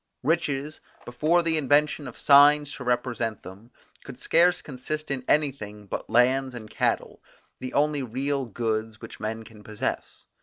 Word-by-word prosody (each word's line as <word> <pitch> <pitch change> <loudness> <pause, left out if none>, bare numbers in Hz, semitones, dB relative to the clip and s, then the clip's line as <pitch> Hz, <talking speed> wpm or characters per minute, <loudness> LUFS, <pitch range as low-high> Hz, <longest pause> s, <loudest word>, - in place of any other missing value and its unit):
Riches, 150 -1 -1 0.3
before 155 +8 +1
the 165 -1 +1
invention 145 0 +2
of 125 - -10
signs 145 +1 +6
to 130 - -7
represent 120 -3 -2
them, 100 +6 -12 0.3
could - - -11
scarce 175 +2 +3
consist 150 +3 -6
in 135 -2 -3
anything 110 -9 -1
but - - -6
lands 130 +2 +2
and 110 -3 -8
cattle, - - -1 0.4
the 130 - -6
only 150 0 +2
real 135 +2 -2
goods 110 -1 -3
which - - -11
men 110 +1 -4
can 110 -1 -15
possess. 105 0 -5
130 Hz, 150 wpm, -26 LUFS, 115-150 Hz, 0.4 s, signs